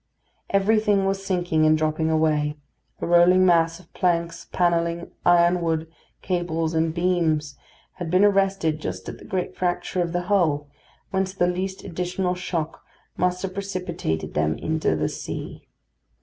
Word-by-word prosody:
Everything 205 0 +3
was 195 0 -1
sinking 175 -4 +1
and 155 0 +5
dropping 155 +1 0
away; 155 -2 +1 0.4
a - - -1
rolling 175 +2 +5
mass 165 -1 +3
of 180 - -20
planks, 170 -2 0
panelling, 170 -1 0 0.2
ironwork, 170 -2 +3 0.4
cables, 170 -3 -1
and 160 0 +1
beams 160 -4 0 0.4
had 175 -3 -4
been 185 +4 +4
arrested 195 -6 +2
just 95 -4 -5
at - - -7
the - - -13
great 185 -2 -3
fracture 180 0 -1
of 170 -1 -1
the 175 0 -1
hull, 165 -7 +1 0.4
whence 190 0 -1
the 175 - +2
least 185 +2 -2
additional 180 +1 -2
shock 170 -3 -4 0.3
must 180 +1 0
have 190 -1 -3
precipitated 185 - -3
them 75 0 0
into 160 - 0
the 75 0 0
sea. - - -7
175 Hz, 145 wpm, -24 LUFS, 160-185 Hz, 0.4 s, and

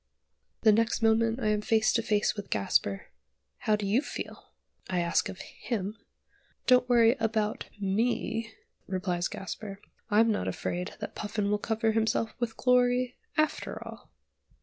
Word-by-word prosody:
The 220 - +6
next 225 +2 +2
moment 225 +1 +3
I 215 -4 +1
am 210 0 +1
face 220 0 +3
to 230 - +2
face 210 -2 +1
with 205 -1 -7
Gasper. 100 -1 0 0.5
"How 215 - +2
do 210 -1 -3
you 215 +7 +3
feel?" - - -7 0.4
I 185 -1 0
ask 170 -1 +1
of 190 - -8
him. 210 -3 -4 0.7
"Don't 250 -1 +5
worry 235 0 +5
about 220 -1 0
me," 225 +3 0 0.4
replies 180 -2 -1
Gasper. 195 +1 -7 0.3
"I'm 225 +2 +4
not 210 - -1
afraid 180 +1 -3
that 210 - -5
Puffin 205 -1 -2
will 210 - +1
cover 225 +1 0
himself 220 0 +1
with 235 -2 -2
glory, 250 0 +2 0.2
after 310 -1 0
all." - - -11
220 Hz, 150 wpm, -29 LUFS, 205-230 Hz, 0.7 s, The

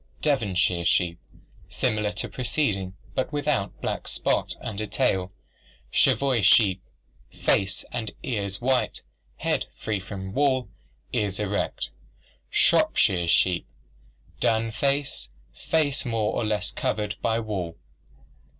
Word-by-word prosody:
Devonshire 95 - +2
sheep, 85 0 +2 0.5
similar 105 -1 0
to 105 - -3
preceding 105 -8 -1 0.2
but 130 - -1
without 145 -8 -1
black - - -3
spot - - 0
under 110 0 -3
tail. 95 -1 +1 0.6
Cheviot 130 -6 +3
sheep, 95 -2 +5 0.5
face 95 -1 0
and 115 -3 -2
ears 100 - -2
white, 125 -3 +1 0.4
head - - 0
free 105 -2 -1
from 95 -1 -7
wool, 130 -1 +2 0.4
ears 100 -2 0
erect. 100 -11 -1 0.6
Shropshire 85 +6 +3
sheep, 90 +1 +3 0.7
dun 115 0 +2
face, 140 - -1 0.2
face 145 - +1
more 115 -3 0
or - - 0
less 105 -1 -1
covered 105 -1 -1
by 115 -1 +1
wool. 95 -7 -4
105 Hz, 110 wpm, -26 LUFS, 95-125 Hz, 0.7 s, sheep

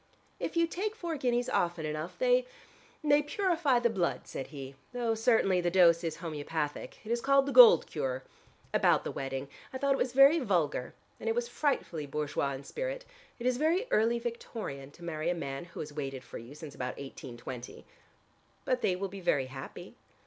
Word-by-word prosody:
"If - - -3
you 335 - +5
take 405 +6 -3
four 340 -6 -3
guineas 245 -3 0
often 170 -2 0
enough 155 +3 -4
they - - +3 0.6
they 290 0 +5
purify 325 - +1
the 240 0 +3
blood," 180 -5 0
said 135 - -6
he, 135 -2 -8 0.2
"though 240 -2 0
certainly 220 -5 +3
the 175 - +1
dose 170 -2 +5
is 165 -2 -2
homeopathic. 155 -2 -4
It 220 - -4
is 235 0 +1
called 275 +1 +4
the 280 - -2
gold 485 -2 +9
cure. 130 0 -3 0.5
About - - +4
the - - -3
wedding. 135 0 -4 0.2
I 260 - -4
thought 280 +1 +2
it 270 - -2
was 250 - 0
very 275 +5 +7
vulgar. 170 - 0 0.2
And 225 - -2
it 225 - +1
was 240 0 0
frightfully 240 - -1
bourgeois 140 -1 -1
in 135 +1 -7
spirit. - - -4 0.3
It 235 - -7
is 250 -1 +2
very 330 - +2
early 230 +2 +3
Victorian 225 - -5
to 170 +4 -16
marry 165 -1 -2
a 175 - +1
man 135 -2 -5
who 170 - -8
has 150 -1 -7
waited 135 -3 -4
for - - -8
you 120 +5 -11
since 150 -2 -9
about 125 0 -4
1820." 125 -2 -8 0.8
"But 255 -1 +1
they 185 - +2
will 195 +2 -3
be 195 0 -9
very 145 -6 +2
happy." 135 0 -8
190 Hz, 190 wpm, -31 LUFS, -, 0.8 s, gold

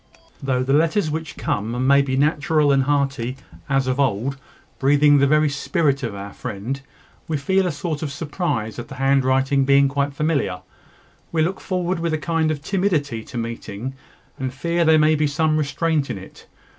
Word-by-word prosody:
Though 130 -2 0
the 135 +1 0
letters 160 +2 +2
which 160 -1 -5
come 115 +5 -2
may 140 +1 +6
be 130 -1 -1
natural 150 +1 +2
and 135 -1 +4
hearty, 135 -3 0 0.3
as 135 -1 +2
of 130 +1 -1
old, 135 0 0 0.4
breathing 145 +1 +5
the 140 - +4
very 155 +1 +4
spirit 140 0 0
of 115 -6 -4
our 100 0 -7
friend, 120 +8 -5 0.5
we 155 - -1
feel 190 +6 +1
a - - 0
sort 150 0 -4
of 150 -3 -3
surprise 145 - -3
at 120 - -6
the 135 - -9
handwriting 135 0 +2
being 140 +1 +5
quite 140 +1 -1
familiar. 140 - 0 0.7
We 160 -1 +2
look 185 +4 -2
forward 180 -1 -1
with 165 -1 -1
a - - +1
kind 160 0 0
of 145 -2 -3
timidity 160 - 0
to - - -8
meeting, 115 +1 -5 0.5
and 130 -1 -2
fear 170 +6 0
there 160 0 +6
may 155 0 +4
be 155 0 +2
some 155 +2 +1
restraint 155 0 0
in - - -3
it. 95 - -13
140 Hz, 180 wpm, -22 LUFS, 130-155 Hz, 0.7 s, may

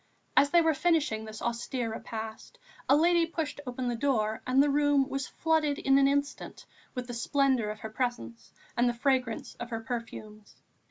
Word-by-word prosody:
As 285 - +5
they 340 +2 +5
were 320 -1 +3
finishing 295 -9 +1
this 215 0 -8
austere 235 0 -2
repast, 225 - -7 0.3
a 275 - +7
lady 335 +2 +4
pushed 310 -3 -4
open 250 0 -3
the 240 - 0
door 225 -4 0
and 260 +2 +5
the 290 - +2
room 290 -1 +3
was 275 -1 -3
flooded 315 -3 +1
in 270 0 +3
an 275 - +5
instant 285 +1 -2 0.3
with 250 -1 -3
the 245 - -7
splendour 260 -2 +1
of 215 0 -6
her 220 - -5
presence 115 - -4 0.2
and 240 +1 +3
the 240 - -2
fragrance 255 -2 0
of 240 - -6
her 225 -2 -4
perfumes. 225 -3 -7
255 Hz, 180 wpm, -29 LUFS, 225-285 Hz, 0.3 s, a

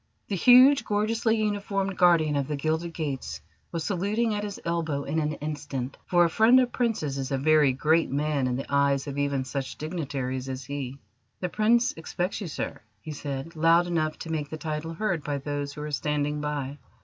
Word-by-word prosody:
The 200 - 0
huge, 255 +8 +7
gorgeously 220 +2 +1
uniformed 200 -2 -1
guardian 170 -5 +4
of 140 -2 0
the 150 - -2
Gilded 160 +4 -1
Gates 145 -5 -4 0.3
was 165 -2 -3
saluting 210 +5 0
at 205 0 -2
his 205 -1 -5
elbow 165 -4 -1
in 155 +4 -1
an 150 -1 -1
instant, 145 -3 -5
for 175 -1 +4
a - - +4
friend 225 +7 +6
of 250 -1 +1
Princes 185 - -1
is 135 +1 -4
a 135 - +1
very 150 0 +4
great 155 +5 +2
man 145 -1 0
in 125 - -1
the 135 - -4
eyes 140 -1 +2
of 140 -1 -4
even 140 -2 0
such 135 0 -4
dignitaries 135 -5 -3
as 130 0 -5
he. 140 -1 -5 0.4
"The 180 - -2
Prince 230 +5 +3
expects 175 +5 -3
you, 195 - -4
sir," 155 - -5 0.2
he 155 - -8
said, 145 +2 -5
loud 165 +2 +4
enough 155 -3 -1
to 165 - -7
make 150 -2 -2
the 155 - -5
title 155 +1 -4
heard 175 -5 -1
by 145 -1 -2
those 145 0 -4
who 150 - -8
were 150 0 -5
standing 150 0 -1
by. 145 -1 -3
155 Hz, 195 wpm, -27 LUFS, 140-180 Hz, 0.4 s, huge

